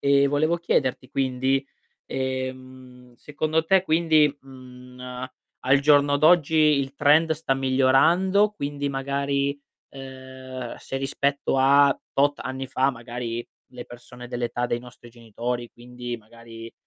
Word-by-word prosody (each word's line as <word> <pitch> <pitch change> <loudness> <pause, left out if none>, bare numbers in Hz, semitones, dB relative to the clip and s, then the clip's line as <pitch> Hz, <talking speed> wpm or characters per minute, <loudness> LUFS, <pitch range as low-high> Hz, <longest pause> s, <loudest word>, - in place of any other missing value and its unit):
Ehm, 140 0 +3
volevo 155 +4 +1
chiederti 130 -6 -1
quindi, 135 +1 0 0.4
ehm, 130 -1 -6
secondo 155 +4 -2
te 190 +2 +3
quindi, 155 -4 +3
mhmm, 125 -1 -14
n - - -14
ehm, 125 0 -7 0.3
al 135 +2 +3
giorno 145 0 +4
d'oggi 160 +1 +4
il 145 -3 +3
trend 155 +3 +4
sta 155 -3 -1
migliorando, 135 +10 +3
quindi 145 -7 -4
magari, 140 +1 -2 0.3
ehm, 130 -1 -9
se 135 - -7
rispetto 140 +1 -1
a 140 +1 +5 0.2
tot 145 +1 +2
anni 130 0 -5
fa, 135 +1 +1
magari, 120 -1 -6 0.3
le 125 -1 -9
persone 120 0 -12
dell'età 120 0 -3
dei 120 - -2
nostri 120 -1 -14
genitori, 120 +1 -5
quindi 120 0 -8
magari, 115 +1 -13
135 Hz, 130 wpm, -24 LUFS, 125-145 Hz, 0.4 s, a